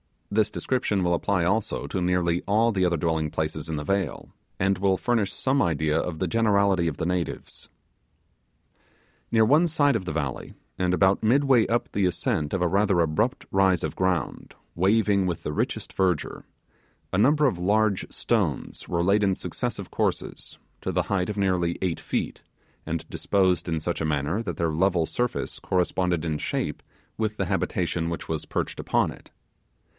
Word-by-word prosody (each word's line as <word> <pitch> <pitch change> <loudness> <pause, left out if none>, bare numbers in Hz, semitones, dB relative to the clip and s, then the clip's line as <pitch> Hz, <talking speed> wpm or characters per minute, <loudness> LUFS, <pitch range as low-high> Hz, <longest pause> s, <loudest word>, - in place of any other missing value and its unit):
This 105 0 +2
description 105 -7 -1
will 85 0 +2
apply 90 +1 +1
also 100 +5 0
to 95 - -3
nearly 90 -1 +1
all 110 +4 +3
the 95 -3 +1
other 85 -1 +1
dwelling 80 -1 0
places 80 0 -3
in 80 - -2
the 75 - -3
vale, 100 +5 -2 0.3
and 95 0 +2
will 95 0 +2
furnish 115 -4 0
some 135 +1 +1
idea 80 -2 +1
of 80 -1 -3
the 95 - -1
generality 100 -3 +2
of 75 - -3
the 85 - -2
natives. 90 -1 -4 1.6
Near 110 -1 +4
one 150 +9 +4
side 145 -4 +2
of 95 - -7
the 75 - -3
valley, 70 -4 -3 0.3
and 90 -1 +1
about 95 +1 +3
midway 130 +1 +4
up 120 +1 -1
the 100 - +1
ascent 80 -4 -1
of 95 - 0
a 90 - +3
rather 95 -1 +2
abrupt 85 - 0
rise 95 -3 +3
of - - -3
ground 95 -6 -1 0.2
waving 100 +1 +2
with 85 -3 -3
the - - -3
richest - - -2
verdure, 90 -5 -1 0.7
a - - +2
number 145 +8 +4
of 95 -10 +1
large 105 +2 +1
stones - - -1
were 85 -1 0
laid 100 +3 +3
in 95 -2 +2
successive - - -4
courses, - - -2 0.2
to - - -3
the - - +1
height 90 -1 0
of 105 - -4
nearly 90 -3 +1
eight 90 -3 -1
feet, - - -3 0.5
and 85 0 -3
disposed 95 -4 +1
in 80 -1 0
such 85 +1 -2
a - - 0
manner 75 +6 0
that 90 -8 -4
their 85 -1 0
level 85 +1 +2
surface 120 +8 -2
corresponded 90 -2 0
in 80 -2 -1
shape - - -2 0.4
with 110 -1 -1
the - - 0
habitation 85 -1 -1
which 85 - -5
was 80 -2 -2
perched - - -3
upon - - +1
it. - - -14
95 Hz, 175 wpm, -25 LUFS, 85-105 Hz, 1.6 s, Near